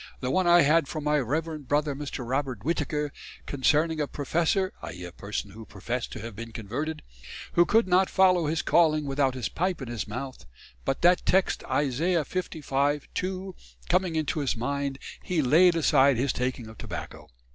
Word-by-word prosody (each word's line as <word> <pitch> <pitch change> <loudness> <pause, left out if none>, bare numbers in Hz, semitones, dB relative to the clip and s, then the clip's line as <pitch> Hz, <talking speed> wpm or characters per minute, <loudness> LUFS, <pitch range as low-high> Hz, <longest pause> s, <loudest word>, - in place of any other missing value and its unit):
The 130 0 -2
one 185 +5 +2
I 175 0 +7
had 150 +1 +3
from 155 0 -5
my 150 0 +2
reverend 150 +2 -3
Brother 145 +1 +1
Mr. 140 -3 -5
Robert 130 -4 -2
Whittaker, 150 -2 -1 0.3
concerning 155 +3 +1
a 145 - -1
professor 170 +7 0
[i.e. 90 - -7
a 90 - -8
person 100 +2 -5
who 110 +3 -10
professed 115 +4 -4
to - - -7
have 115 -1 -7
been 115 +2 -7
"converted"] 125 +9 -4 0.5
who 175 0 +4
could 225 +2 +3
not 185 +1 +3
follow 185 -4 +4
his 160 +1 -1
calling 155 -3 +3
without 135 -1 0
his 125 -3 -2
pipe 180 +1 -1
in 130 -4 -6
his 120 -2 -4
mouth, 125 - -7 0.4
but 135 - -1
that 175 +1 +5
text 190 +1 +2
Isaiah 150 +4 +1
55, 145 -5 -1
2, 185 0 -3 0.3
coming 180 -1 +1
into 155 0 -1
his 135 -5 -1
mind 140 +3 -2 0.2
hee 170 -4 0
layd 170 +7 +5
aside 140 -5 +4
his 130 +2 +1
taking 125 -1 -2
of 110 - -13
tobacco. - - -7
145 Hz, 180 wpm, -27 LUFS, 130-170 Hz, 0.5 s, I